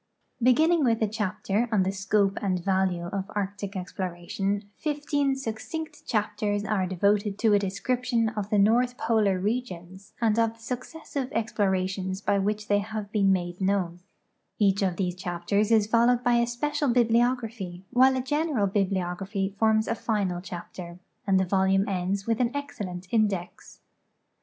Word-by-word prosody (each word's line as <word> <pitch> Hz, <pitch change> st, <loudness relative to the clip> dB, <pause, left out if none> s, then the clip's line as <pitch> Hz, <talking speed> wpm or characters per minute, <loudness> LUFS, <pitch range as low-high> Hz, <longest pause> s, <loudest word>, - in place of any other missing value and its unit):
Beginning 310 Hz, +7 st, +4 dB
with 230 Hz, -3 st, +2 dB
a -, -, +2 dB
chajder 210 Hz, +2 st, -1 dB
on 205 Hz, -4 st, +3 dB
the 190 Hz, -, 0 dB
scope 195 Hz, 0 st, +1 dB
and 185 Hz, -3 st, -1 dB
value 190 Hz, -3 st, +1 dB
of 195 Hz, +2 st, -4 dB
arctic 200 Hz, 0 st, -3 dB
ex 185 Hz, 0 st, -6 dB
ploration, 195 Hz, +2 st, -2 dB
fifteen 290 Hz, -2 st, 0 dB
succinct 270 Hz, +6 st, -6 dB
chaptei's 210 Hz, -2 st, -1 dB
are 200 Hz, -3 st, 0 dB
devoted 200 Hz, +2 st, +1 dB
to 220 Hz, -1 st, +3 dB
a 205 Hz, -, +5 dB
description 235 Hz, +4 st, 0 dB
of 210 Hz, -2 st, -4 dB
the 210 Hz, -, +2 dB
north 240 Hz, +5 st, +3 dB
polar 215 Hz, -5 st, +2 dB
regions 190 Hz, -3 st, -4 dB
and 225 Hz, -1 st, +2 dB
of 225 Hz, -1 st, +2 dB
the -, -, -25 dB
successive 260 Hz, +3 st, -5 dB
explorations 190 Hz, -3 st, -1 dB
by 200 Hz, 0 st, +1 dB
which 210 Hz, +2 st, -1 dB
they 205 Hz, 0 st, +3 dB
have 210 Hz, -1 st, -5 dB
been 200 Hz, -3 st, +3 dB
made 175 Hz, -1 st, -1 dB
known; 185 Hz, -3 st, 0 dB, 0.6 s
each 200 Hz, -1 st, +3 dB
of 185 Hz, -3 st, +1 dB
these 180 Hz, -2 st, -1 dB
chapters 180 Hz, +3 st, -1 dB
is 220 Hz, -2 st, +4 dB
followed 235 Hz, +2 st, +3 dB
by 245 Hz, -, +3 dB
a 235 Hz, 0 st, +2 dB
special 290 Hz, +4 st, -1 dB
bibliography, 230 Hz, -6 st, +1 dB
while 260 Hz, +1 st, +5 dB
a -, -, 0 dB
general 290 Hz, -4 st, 0 dB
bibliography 195 Hz, 0 st, -1 dB
forms 220 Hz, -1 st, +3 dB
a -, -, +1 dB
final 200 Hz, -6 st, -1 dB
chapter, 175 Hz, -1 st, -8 dB, 0.3 s
and 190 Hz, -1 st, +4 dB
the 190 Hz, -, +2 dB
volume 190 Hz, +1 st, +2 dB
ends 195 Hz, +1 st, -1 dB
with 230 Hz, -1 st, 0 dB
an 245 Hz, -2 st, +2 dB
excellent 205 Hz, -11 st, -5 dB
index. 205 Hz, -6 st, -1 dB
205 Hz, 155 wpm, -27 LUFS, 190-230 Hz, 0.6 s, a